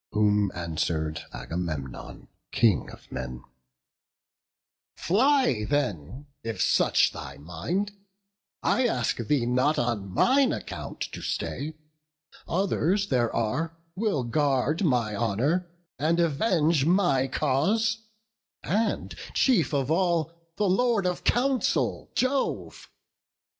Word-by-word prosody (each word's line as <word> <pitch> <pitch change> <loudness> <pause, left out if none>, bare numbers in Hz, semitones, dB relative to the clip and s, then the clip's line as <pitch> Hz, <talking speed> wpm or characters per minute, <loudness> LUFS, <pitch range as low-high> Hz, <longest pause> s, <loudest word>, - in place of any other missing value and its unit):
Whom 105 -1 +3
answer'd 80 -1 -2
Agamemnon, 75 -1 -5 0.2
King 115 -5 +2
of - - -14
men: 65 -1 -6 1.5
"Fly 225 - +2
then, 125 - -2 0.2
if 115 -1 -5
such - - +3
thy - - -8
mind! 90 - -3 0.7
I 255 -1 +3
ask 125 - 0
thee 120 +2 0
not 130 +5 +2
On 115 -5 -1
mine 260 - +3
account - - -7
to - - -7
stay; 155 +3 -3 0.7
others 195 +2 +1
there 120 -3 +2
are 160 +9 -1 0.2
Will 195 - 0
guard 140 - +1
my 120 - +1
honour 130 - 0 0.3
and 165 +4 +2
avenge 165 -2 +2
my 165 -6 +3
cause: 195 +12 +1 0.6
And 215 +4 -1 0.2
chief 220 - +3
of 140 -1 0
all, 170 -2 +1 0.2
the 210 - +1
Lord 210 +1 +2
of 180 -1 -1
counsel, 260 +1 +1
Jove! 260 +1 -1
145 Hz, 105 wpm, -27 LUFS, -, 1.5 s, Whom